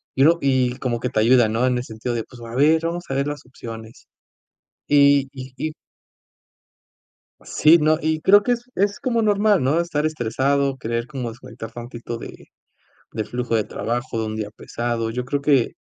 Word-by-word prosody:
y 135 - +4
uno 165 +3 +5
y 130 -2 +2
como 120 -2 -2
que 125 - -2
te 120 - 0
ayuda, 120 +1 +5
¿no? 115 +3 0
En 125 -1 +1
el 125 - -3
sentido 115 +1 -4
de, 115 -1 -2
pues, 125 -2 -15
a 115 0 -8
ver, 155 +4 +4
vamos 170 +1 -3
a - - -2
ver 140 +1 0
las 145 -1 -5
opciones. 115 -2 -10 0.8
Y 140 -1 +5
y 130 -1 -9
y 155 +2 -3 1.7
Sí, 160 +2 +5
no, 155 +1 +3
y 155 0 0
creo 205 +4 +6
que 245 - 0
es 240 0 -2
es 200 +1 0
como 235 -3 0
normal, 205 -4 +3
¿no? 145 +6 +2
Estar 155 -3 -1
estresado, 140 0 0
querer 115 -1 -3
como 130 -4 -4
desconectar 115 -1 -10
tantito 120 0 -7
de - - -11 0.7
del 110 -2 -3
flujo 120 -1 -3
de 110 - +3
trabajo, 120 +2 -3
de 110 - -1
un 110 0 -4
día 105 -1 -4
pesado. 115 +1 -3
Yo 125 +2 -3
creo 140 +3 -2
que 140 -4 +2
130 Hz, 195 wpm, -22 LUFS, 115-155 Hz, 1.7 s, creo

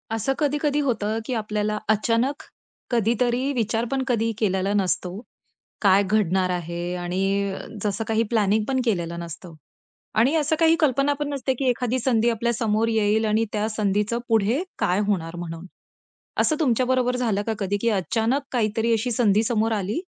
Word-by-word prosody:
असं 245 +5 0
कधी-कधी 295 0 +1
होतं, 220 -3 0
की 255 - -3
आपल्याला 210 0 -2
अचानक 230 +6 +1 0.5
कधीतरी 240 +3 +1
विचार 230 -1 0
पण 270 -1 0
कधीही 230 -2 +1
केलेला 195 -2 0
नसतो, 185 -2 0 0.7
काय 200 -1 +5
घडणार 190 -2 +1
आहे? 175 0 -3
आणि 195 +3 -1 0.3
जसं 210 +1 -1
काही 225 0 +2
प्लॅनिंग 215 -1 +2
पण 265 -1 +1
केलेलं 170 -6 -1
नसतं 170 +1 -8 0.7
आणि 260 +8 +3
असं 310 0 +2
काही 325 0 +5
कल्पना 280 -2 +2
पण 295 -1 -2
नसते, 265 -1 -1
की 260 +1 -2
एखादी 250 +1 0
संधी 235 -2 +2
आपल्या 235 +1 0
समोर 225 -1 +1
येईल 220 -1 +2
आणि 215 +1 +2
त्या 210 0 0
संधीचं 210 +1 0
पुढे 225 - +2 0.2
काय 180 +2 +1
होणार 170 -5 -1
म्हणून? 165 0 -6 0.8
असं 310 - +2
तुमच्या 255 -5 +2
बरोबर 250 -1 +1
झालं 225 -5 0
का 225 - +1
कधी, 200 0 -1
की 235 - +2
अचानक 225 +6 0
काहीतरी 225 -1 0
अशी 230 +2 0
संधी 215 -2 +3
समोर 225 -1 +1
आली 205 - -2
220 Hz, 160 wpm, -24 LUFS, 200-245 Hz, 0.8 s, काय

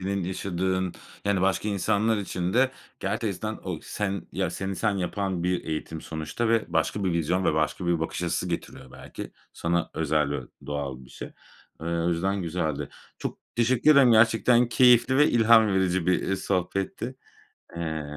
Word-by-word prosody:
Senin 95 -1 -2
yaşadığın 95 0 -1 0.3
yani, 100 -2 +1
başka 95 +3 +1
insanlar 105 +3 +1
için 90 -3 -3
de 130 +3 +3 0.3
gerçekten 105 +1 -2
o 90 -4 -3
sen 100 -2 -3
ya, 95 -3 -1
seni 95 +1 -4
sen 105 -1 0
yapan 95 -1 -2
bir 90 0 0
eğitim 80 0 -4
sonuçta 80 +10 -3
ve 115 -1 +3
başka 105 - 0
bir 90 - +1
vizyon 85 +3 0
ve 80 - +2
başka 80 +3 -1
bir 85 -2 +1
bakış 80 +2 -3
açısı 90 +1 -1
getiriyor 75 -6 -6
belki. - - -9 0.2
Sana 85 0 -1
özel 75 -2 +1
ve 70 - -2 0.3
doğal 70 -3 -4
bir 65 - -17
şey. - - -8 0.5
Eee, 80 - -6
o 85 0 0
yüzden 95 +3 0
güzeldi. 80 -3 -2 0.3
Çok - - -5 0.2
teşekkür 120 +4 +3
ederim. 135 -5 +6
Gerçekten 115 +2 +4
keyifli 125 +1 +5
ve 150 +2 +5
ilham 115 -1 +6
verici 95 -2 +1
bir, 90 - +2
eee, 95 - +1
sohbetti. 95 +7 -2 0.6
Eee 80 -2 -3
95 Hz, 165 wpm, -26 LUFS, 85-110 Hz, 0.6 s, ederim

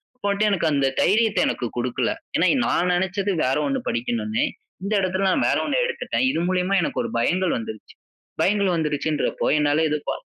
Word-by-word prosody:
அப்ப 250 - -11
வந்துட்டு 210 +1 +2
எனக்கு 175 -4 +1
அந்த 140 -1 +2
தைரியத்த 220 +1 +3
எனக்கு 125 - -2
குடுக்கல. 120 - -1 0.2
ஏன்னா, - - +3 0.2
நான் 180 - +1
நெனச்சது 190 +3 0
வேற 130 +2 +1
ஒண்ணு 270 -1 -1
படிக்கணும்னு 235 0 -1 0.4
இந்த 200 +2 -2
இடத்துல 185 +1 0
நான் - - +2
வேற - - +2
ஒண்ணு - - +1
எடுத்துட்டேன். 475 - -2
இது 165 - -1
மூலியமா 185 +1 +1
எனக்கு - - -2
ஒரு - - -4
பயங்கள் 180 +9 +1
வந்துருச்சு. 110 -2 -8 0.5
பயங்கள் 200 -2 +2
வந்துருச்சுடுறப்போ 150 -1 -1
என்னால 150 +1 +2 0.2
ப - - +1
185 Hz, 170 wpm, -23 LUFS, 155-210 Hz, 0.5 s, தைரியத்த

